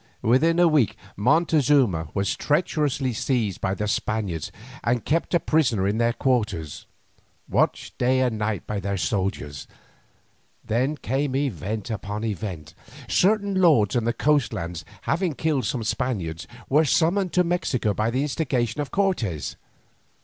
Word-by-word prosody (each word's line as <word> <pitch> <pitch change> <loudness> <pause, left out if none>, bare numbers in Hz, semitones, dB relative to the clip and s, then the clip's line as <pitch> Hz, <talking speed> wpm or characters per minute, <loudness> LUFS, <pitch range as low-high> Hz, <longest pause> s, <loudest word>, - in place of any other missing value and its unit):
Within 135 +9 +3
a 175 0 +6
week 135 - +2 0.2
Montezuma 135 - +3
was 100 0 0
treacherously 150 -5 0
seized 110 -4 -1
by 95 0 0
the 105 - -2
Spaniards 100 -7 -2 0.3
and 120 -1 0
kept 165 +3 0
a - - +4
prisoner 120 -14 +1
in 105 +3 0
their 115 0 +3
quarters, 105 - -1 0.6
watched - - 0
day 130 +1 +3
and 125 -3 +1
night 105 -1 -2
by 105 - -3
their 100 0 -2
soldiers. 95 -8 -2 1.0
Then 130 +7 0
came 135 +1 -1
event 110 - -2
upon 105 0 -4
event. 90 -7 -4 0.3
Certain 200 - +2
lords 130 - +4
in 120 -2 +1
the 120 - +2
coast 140 -1 +1
lands 85 0 -5 0.2
having 170 -2 0
killed 150 -6 0
some 115 +3 -2
Spaniards, 100 -9 -2 0.2
were 150 +4 +4
summoned 175 +5 +2
to 180 - +4
Mexico 165 - 0
by 110 +3 0
the 130 +4 0
instigation 130 -4 -1
of 145 - -4
Cortes. 125 - -1
120 Hz, 140 wpm, -24 LUFS, 105-150 Hz, 1.0 s, a